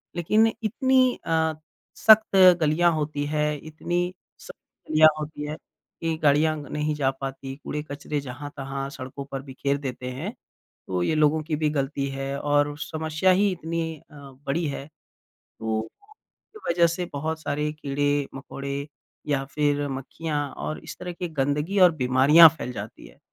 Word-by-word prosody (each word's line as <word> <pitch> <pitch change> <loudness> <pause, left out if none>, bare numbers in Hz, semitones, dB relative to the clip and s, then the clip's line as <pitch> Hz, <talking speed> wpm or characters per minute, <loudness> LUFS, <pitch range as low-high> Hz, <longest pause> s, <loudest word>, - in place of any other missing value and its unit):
लेकिन 215 +6 +3 0.2
इतनी 260 +3 +3
अ, 160 -1 +1 0.4
सख्त 220 -2 +6 0.3
गलियाँ 165 +3 +3
होती 150 -1 -2
हैं 150 0 0
इतनी 175 +3 -2 0.3
सख्त - - -16
गलियाँ 155 0 +7
होती 150 -1 -5
हैं, 155 - -5 0.4
कि 165 -1 -1
गाड़ियाँ 150 +2 +3
ग 145 - -10
नहीं 150 0 -1
जा 135 -2 +1
पाती, 135 0 -6
कूड़े-कचरे 150 0 -4
जहाँ-तहाँ 135 0 -6
सड़कों 135 +1 -7
पर 135 -1 -3
बिखेर 140 +1 -2
देते 125 -2 -5
हैं। 165 - -5 0.5
तो 90 -1 -1
ये 155 - +1
लोगों 155 +1 +3
की 155 0 -2
भी 150 0 +1
गलती 140 -1 -1
है 135 0 -4
और 145 0 +1
समस्या 160 +4 0
ही 200 +2 +3
इतनी 165 -1 -3 0.3
अ, - - -14 0.3
बड़ी 160 +4 0
है, 140 0 -5 0.7
तो 110 -1 -1 0.7
की - - -10
वजह 170 0 +4
से 175 +2 -2
बहुत 160 +2 -3
सारे 150 +1 -1
कीड़े-मकोड़े 140 -1 -3 0.4
या 135 -2 +1
फिर 145 -1 +1
मक्खियाँ 145 +3 -4 0.3
और 155 - -4
इस - - -9
तरह 180 -1 -5
की 175 +1 -4
गँदगी 150 +6 0
और 180 -2 +8
बीमारियाँ 140 +5 +7
फैल 125 - -5
जाती 105 +1 -8
हैं। - - -19
150 Hz, 150 wpm, -25 LUFS, 140-160 Hz, 0.7 s, और